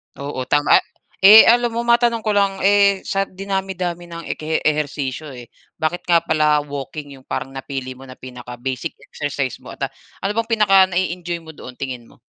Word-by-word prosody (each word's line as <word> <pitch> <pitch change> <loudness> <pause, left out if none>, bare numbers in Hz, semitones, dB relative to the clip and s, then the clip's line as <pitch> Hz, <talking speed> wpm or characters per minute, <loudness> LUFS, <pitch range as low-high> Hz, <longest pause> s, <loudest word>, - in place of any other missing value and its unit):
Oo, 140 -2 -5
tama, 145 +1 +4
ah, - - -12 0.4
eh, 210 +3 +10
alam 240 -1 +3
mo 235 - -1
matanong 235 -1 +2
ko 215 - 0
lang, 200 -1 +1
eh, 200 -1 +4
sa 195 0 -1
dinami-dami 185 -2 -4
ng 170 0 -8
ekehe 155 +1 -2
ehersisyo, 150 -1 -2
eh. 120 -1 -11 0.3
Bakit 165 +2 -3
nga 170 -1 +4
pala 150 -2 +2
walking 145 0 -7
yung 130 - -23
parang 135 - -4
napili 135 -1 -6
mo 135 - -12
na 130 - -11
pinaka-basic 125 +3 -6 0.2
exercise 140 -3 -3
mo - - -11
at, - - -6
ah, - - -34 0.3
ano 195 - 0
bang 230 0 0
pinaka 205 -3 +3
na-e-enjoy 175 -2 -3
mo 160 - -10
doon, 125 -4 -11
tingin 125 -3 -6
mo? - - -22
160 Hz, 185 wpm, -20 LUFS, 135-195 Hz, 0.4 s, eh